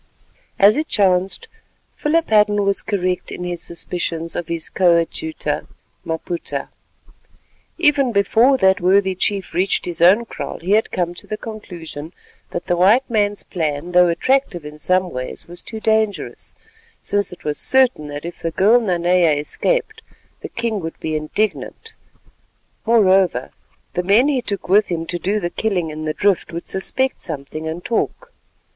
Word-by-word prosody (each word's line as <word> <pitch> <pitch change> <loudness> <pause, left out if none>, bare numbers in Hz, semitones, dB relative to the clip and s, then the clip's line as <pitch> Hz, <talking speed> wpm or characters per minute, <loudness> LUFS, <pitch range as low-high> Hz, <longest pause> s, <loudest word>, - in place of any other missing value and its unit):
As 205 +5 +6
it 310 +1 -1
chanced, 190 - +1 0.5
Philip 325 -2 0
Hadden 210 -1 +4
was 200 0 +1
correct 185 -3 -2
in 180 - -6
his 175 -1 -3
suspicions 170 -1 -4
of 170 - -3
his 165 -1 -1
coadjutor, 180 - 0 0.4
Maputa. 165 +1 -4 1.1
Even 290 -6 +3
before 230 +6 +4
that 190 -4 +3
worthy 190 +1 +3
chief 195 +1 -2
reached 185 +2 +1
his 170 -2 -3
own 195 +7 +6
kraal, - - -6
he 175 +4 -4
had 215 +2 +3
come 175 -1 -1
to - - -10
the 215 - -4
conclusion 170 -8 -8 0.4
that 175 - -5
the 175 - +1
white 205 +9 +4
man's 205 -2 +1
plan, 160 -1 -3
though 180 0 +6
attractive 175 - 0
in 150 0 -9
some 185 +3 +1
ways, 130 0 -5
was 175 +1 -9
too 220 - -7
dangerous, 220 -2 0 0.5
since 205 -1 +1
it 180 - -12
was 150 -1 -1
certain 255 - +3
that 145 +1 -7
if 170 - -7
the 165 - -2
girl 210 +8 +4
Nanea 175 -4 +2
escaped, 435 - -1 0.4
the - - -7
king 230 -2 -2
would 165 -2 -7
be 155 -1 -3
indignant. 155 +8 -3 0.9
Moreover, 190 - +3 0.4
the 180 - 0
men 210 +10 +4
he 270 -4 +1
took 200 -5 -4
with 205 +3 +4
him 165 -2 -3
to 175 +1 -4
do 205 +4 0
the 175 -3 -3
killing 180 -7 -1
in 155 +1 -6
the 155 - -1
drift 200 -2 +1
would 170 +1 -6
suspect 260 +7 0
something 155 0 -5
and 165 +2 -5
talk. 485 - -2
185 Hz, 160 wpm, -20 LUFS, 170-215 Hz, 1.1 s, As